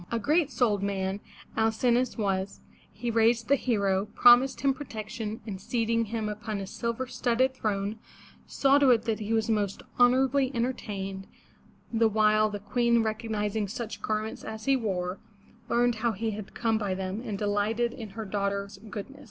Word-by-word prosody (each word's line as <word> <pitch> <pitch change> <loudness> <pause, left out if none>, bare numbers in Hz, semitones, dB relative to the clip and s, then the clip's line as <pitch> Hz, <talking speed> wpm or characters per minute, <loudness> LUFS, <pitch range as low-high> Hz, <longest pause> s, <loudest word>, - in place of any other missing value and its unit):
'' - - -25
A 235 - +1
great 300 +6 +2
souled 215 -7 +1
man 195 0 -2 0.4
Al 220 0 +3
cin'o 240 +2 +2
us 255 - -4
was; 195 -2 -1 0.3
he 235 +3 -3
raised 230 +1 +2
the 280 - +6
hero, 200 -6 0
promised 245 +2 +6
him 275 -1 +3
protection, 220 -5 -6
and 195 -4 -6
seating 230 +1 0
him 220 0 -3
upon 210 0 -4
a 195 - -4
silver 235 +5 -3
studded 250 +1 +1
throne, 210 -3 -2 0.5
saw 275 +1 +3
to 280 -2 +5
it 235 -3 +4
that 225 -1 -1
he 215 0 -4
was 220 -1 +2
most 205 -3 -1 0.2
honorably 260 +2 +4
entertained, 200 -6 -3 0.7
the 225 0 +4
while 215 0 +3
the 205 - -4
Queen, 235 +3 +2
recognizing 215 -1 -2
such 230 +2 -6
garments 215 0 -3
as 220 0 -7
he 275 - +4
wore, 190 -6 -2 0.5
learned 240 0 +3
how 230 +1 0
he 220 +3 -2
had 210 -1 -8
come 225 -2 +1
by 200 -3 -1
them, 190 +3 -4
and 215 -5 -4
delighted 210 +4 0
in 225 -5 -8
her 220 - -3
daughter's 200 0 -2
goodness. 250 +7 -7
220 Hz, 175 wpm, -28 LUFS, 205-240 Hz, 0.7 s, the